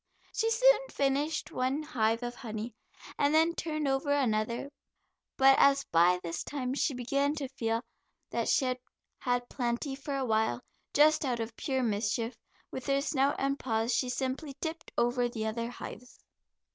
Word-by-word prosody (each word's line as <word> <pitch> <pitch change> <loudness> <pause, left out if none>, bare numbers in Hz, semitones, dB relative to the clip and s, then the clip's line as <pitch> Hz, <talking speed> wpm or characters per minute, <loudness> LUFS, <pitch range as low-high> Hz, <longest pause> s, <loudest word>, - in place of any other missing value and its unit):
She 450 - +1
soon - - +4
finished 285 +3 0
one 260 +4 -1
hive 230 -5 0
of 240 0 -3
honey 225 -2 -6 0.5
and 290 +2 +3
then 325 +2 +4
turned 310 -3 -2
over 270 +2 0
another, 235 -1 0 0.7
but 270 0 +7
as 275 0 +5
by 175 +2 +5
this 170 0 -3
time 260 -3 -3
she 275 0 0
began 275 +4 0
to 285 -3 -3
feel 230 -3 -1 0.5
that - - -1
she 270 - +3
had 255 0 -1 0.4
had 245 -1 0
plenty 245 +3 -2
for 275 +1 -4
a 265 - -1
while, 220 - +1 0.3
just 310 +1 +5
out 250 -4 -1
of 225 0 -4
pure 265 -3 -1
mischief, 225 +2 -1 0.4
with 260 - -6
her 275 0 +3
snout 275 0 +1
and 275 +1 0
paws, 225 -1 0
she 255 - +1
simply 265 +3 -3
tipped 320 0 -5
over 245 0 +2
the 220 -2 -4
other 230 +2 -2
hives. 245 0 -9
260 Hz, 165 wpm, -30 LUFS, 235-285 Hz, 0.7 s, but